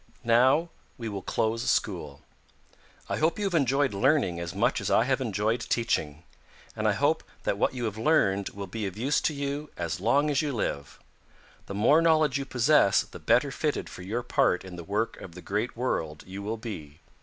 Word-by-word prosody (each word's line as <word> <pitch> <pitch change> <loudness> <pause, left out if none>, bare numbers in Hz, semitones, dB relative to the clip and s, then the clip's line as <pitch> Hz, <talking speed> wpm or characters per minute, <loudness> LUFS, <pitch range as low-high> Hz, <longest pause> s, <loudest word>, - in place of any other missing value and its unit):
"Now 130 +8 +4 0.3
we 115 -2 -5
will 100 -2 -5
close 115 +4 -1
school. 75 -9 -1 0.8
I - - -2
hope 160 +5 +1
you 205 - -2
have 195 - -1
enjoyed 140 -3 +2
learning 100 - +2
as 85 0 -5
much - - +1
as - - -2
I - - +4
have 130 +1 0
enjoyed 110 0 0
teaching, 80 -11 -1 0.5
and 110 -1 0
I 105 - +3
hope 145 +8 +1 0.2
that 100 - -1
what 130 - +1
you 120 -2 -2
have 110 -1 -4
learned 100 -8 +2
will 100 0 -7
be 105 +2 -4
of 95 +1 -7
use 135 +6 +1
to - - +1
you 140 +1 -3
as 85 +1 -3
long 140 +9 +2
as 140 - +2
you 150 -2 -2
live. 70 - -3 0.7
The 100 - -6
more 145 +10 +4
knowledge 155 -4 +3
you 140 - -4
possess 130 -4 +4
the - - -12
better - - +2
fitted - - -2
for - - -10
your 110 +7 -3
part 120 - +1
in 95 -1 -9
the 85 - -7
work 105 +6 -2
of 85 -3 -10
the - - -8
Great 105 +4 -2
World 80 -11 -2
you 95 +2 -7
will 110 +3 -3
be. 80 -10 -8
115 Hz, 200 wpm, -27 LUFS, 95-140 Hz, 0.8 s, Now